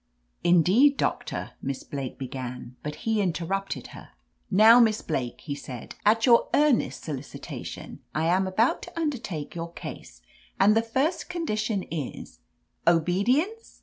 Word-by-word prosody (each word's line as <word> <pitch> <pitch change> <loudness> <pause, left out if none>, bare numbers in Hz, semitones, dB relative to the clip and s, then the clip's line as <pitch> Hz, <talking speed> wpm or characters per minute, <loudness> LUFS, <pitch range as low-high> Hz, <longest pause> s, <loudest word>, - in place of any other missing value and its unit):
"Indeed, 185 - +5
Doctor," - - -2
Miss 135 -1 -4
Blake 135 -3 -5
began, 125 -2 -6
but 150 0 -5
he 220 -2 +2
interrupted 190 +2 -2
her. - - -11 0.4
"Now, 220 +4 +7
Miss 220 -3 +3
Blake," 130 -6 -3
he 145 - -4
said, 130 -4 -8
"at 225 +2 +4
your 235 -2 +5
ear 295 -1 +5
nest 230 - -2
solicitation 145 -3 -7 0.2
I 155 +1 +1
am 185 +3 +2
about 215 +6 +2
to 350 -1 -8
undertake 225 - -3
your 170 0 -5
case, - - -9 0.4
and 205 +2 +5
the 225 - +4
first 265 +9 -1
condition 215 - -1
is 135 - -6 0.2
— - - -47
" - - -38
"Obedience?" 230 - +1
190 Hz, 150 wpm, -26 LUFS, 150-230 Hz, 0.4 s, Now